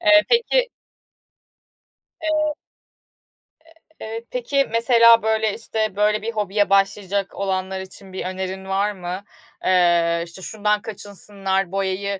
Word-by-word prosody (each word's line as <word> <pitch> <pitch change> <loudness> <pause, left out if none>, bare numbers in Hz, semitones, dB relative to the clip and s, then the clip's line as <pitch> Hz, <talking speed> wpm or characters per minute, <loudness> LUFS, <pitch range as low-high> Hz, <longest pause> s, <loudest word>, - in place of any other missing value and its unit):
Eee, 310 -2 +6
peki. - - +2 1.5
Eee 310 -1 0 1.4
Eee, 225 +1 -6
peki, 275 +3 0
mesela, 230 -1 +6
böyle, 220 -1 +1
işte, 220 -3 -3
böyle, 210 0 +2
bir 230 +1 -3
hobiye 205 -1 0
başlayacak 195 0 +1
olanlar 190 -1 -2
için 190 0 -11
bir - - -4
önerin 190 +1 -4
var 195 +2 0
mı? 185 0 -6 0.4
Eee, 170 -2 +3
işte 170 +3 -10
şundan 210 +1 0
kaçınsınlar 195 -3 -3
boyayı 195 0 -2
200 Hz, 115 wpm, -22 LUFS, 190-225 Hz, 1.5 s, Eee